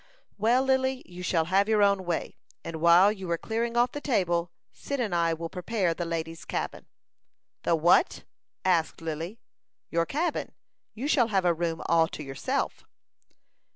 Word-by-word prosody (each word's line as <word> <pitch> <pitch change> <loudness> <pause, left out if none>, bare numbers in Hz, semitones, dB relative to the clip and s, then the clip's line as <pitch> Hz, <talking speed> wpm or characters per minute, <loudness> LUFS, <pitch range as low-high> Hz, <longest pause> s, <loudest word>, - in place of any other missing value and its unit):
"Well, 235 +5 +3
Lily, 265 0 +1
you 180 0 -10
shall 170 -3 +1
have 195 +4 +2
your 215 -2 +4
own 200 -2 +2
way; 175 -2 -2 0.3
and 165 - -5
while 175 +4 +6
you 190 -4 -7
are 170 - +1
clearing 230 +5 -2
off 245 +1 +3
the 290 - -6
table, 175 -10 0 0.2
Cyd 280 -1 -5
and 220 -7 -1
I 170 -1 +2
will 165 +1 -5
prepare 180 0 -1
the 175 +1 -4
lady's 165 -1 -4
cabin." - - -4 0.7
"The 170 - +2
what?" 170 - +3 0.4
asked 170 -4 +1
Lily. 165 +5 -5 0.5
"Your 170 0 +1
cabin; 325 +3 -2 0.4
you 250 +6 -3
shall 255 -6 +3
have 195 -4 +1
a 175 - +4
room 165 0 -2
all 165 -1 +4
to 155 - -7
yourself." 135 -1 -3
180 Hz, 165 wpm, -27 LUFS, 165-230 Hz, 0.7 s, while